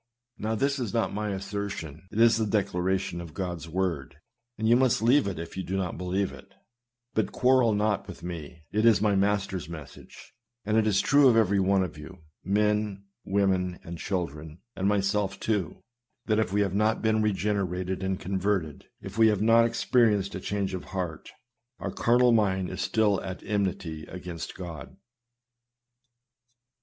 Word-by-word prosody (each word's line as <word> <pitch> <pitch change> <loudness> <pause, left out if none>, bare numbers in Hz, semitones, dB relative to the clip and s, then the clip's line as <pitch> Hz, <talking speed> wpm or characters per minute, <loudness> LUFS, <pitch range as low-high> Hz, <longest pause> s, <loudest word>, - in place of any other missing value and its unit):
Now, 110 +1 -1
this 140 +4 0
is 120 -3 -3
not 115 - 0
my 105 +1 -2
assertion, 95 -5 -5
it 110 - -3
is 115 -1 +6
the 110 -1 0
declaration 95 -3 0
of 85 -3 -10
God's 90 -4 -4
word, 85 -6 -2 0.4
and 110 +1 -1
you 115 - +6
must 125 -3 +2
leave 125 +1 +4
it 95 -4 -3
if 85 +1 -7
you 95 - -3
do 95 +1 -3
not 90 -3 -3
believe 90 +2 -1
it; 100 0 -14 0.6
but 110 - 0
quarrel 125 -3 +3
not 105 -1 0
with 95 - -10
me, 85 -2 -7
it 110 +1 +1
is 115 -3 +6
my 105 -1 +2
Master's 95 -4 0
message; 80 -4 -11 0.3
and 105 +1 0
it 110 -1 +3
is 100 -2 +3
true 145 0 +5
of 120 -3 +5
every 100 -3 +3
one 95 0 +3
of 80 -4 -6
you 75 +4 -10 0.2
— - - -56 0.2
men, 105 -2 0 0.2
women, 95 -2 +1
and 85 0 -8
children, 80 -5 -4 0.2
and 95 - 0
myself 100 -1 0
too 100 -7 -2 0.2
— 120 0 -54
that 110 -1 +2
if 110 -4 0
we 105 +1 +2
have 100 -2 0
not 110 +3 +1
been 110 -1 +2
regenerated 95 -3 -1
and 95 -1 -1
converted, 95 -5 -2 0.2
if 95 +3 -7
we 110 - +7
have 105 -2 +2
not 115 +1 +6
experienced 115 -4 +2
a 95 - -4
change 100 0 -2
of 95 - -5
heart, 90 -5 -5 0.5
our - - -4
carnal 120 +1 +3
mind 95 -5 +1
is 95 0 -4
still 105 0 +2
at 95 -1 -6
enmity 95 -6 -2
against 90 -2 -7
God. 85 -7 -8
100 Hz, 175 wpm, -27 LUFS, 90-110 Hz, 0.6 s, we